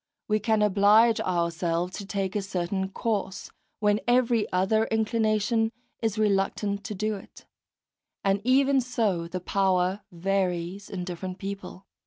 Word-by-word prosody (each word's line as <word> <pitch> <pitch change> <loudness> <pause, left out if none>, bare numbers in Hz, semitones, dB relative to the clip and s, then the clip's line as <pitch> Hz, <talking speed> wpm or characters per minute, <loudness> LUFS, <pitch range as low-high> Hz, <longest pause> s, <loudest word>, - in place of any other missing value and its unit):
We 215 0 +2
can 215 0 +2
oblige 210 +3 +5
ourselves 170 0 -1
to 200 - -7
take 195 -1 -2
a 205 - +1
certain 190 0 -2
course, 195 -2 -3 0.3
when 210 0 +2
every 240 -2 +2
other 195 +5 +2
inclination 220 0 +1 0.3
is 220 -2 -1
reluctant 200 0 0
to 210 - -4
do 215 +2 -1
it; 195 - -15 0.8
and 195 0 +2
even 270 +2 +4
so 215 -9 -1
the 185 +2 -4
power 185 +1 +1
varies 185 +1 -2
in 185 -2 -4
different 180 +1 -5
people. 195 -1 -7
200 Hz, 135 wpm, -27 LUFS, 185-220 Hz, 0.8 s, oblige